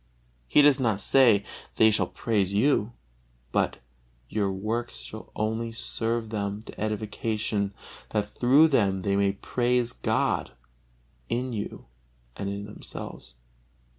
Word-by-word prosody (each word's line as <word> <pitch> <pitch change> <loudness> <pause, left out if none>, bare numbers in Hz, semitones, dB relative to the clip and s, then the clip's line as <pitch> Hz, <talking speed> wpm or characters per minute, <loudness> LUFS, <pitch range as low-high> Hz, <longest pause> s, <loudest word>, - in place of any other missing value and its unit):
He 150 - +5
does 145 -2 +6
not 110 -6 +1
say, 115 -4 +5 0.3
"they 110 0 +6
shall 105 - +1
praise 100 -4 0
you," 110 -1 +3 0.6
but - - +1 0.5
"your 100 -2 0
works 110 +5 -3
shall 110 - -10
only 110 +2 -1
serve 115 0 -2
them 100 0 -3
to - - -10
edification, 105 -1 -2 0.3
that 105 -1 0
through 135 +9 +5
them 100 -9 +2
they 100 +1 +1
may 100 0 +2
praise 120 +4 0
God - - 0 0.8
in 125 +1 -1
you 105 -2 -5 0.5
and 100 0 -3
in 100 0 -4
themselves." 65 -10 -8
110 Hz, 125 wpm, -27 LUFS, 100-120 Hz, 0.8 s, does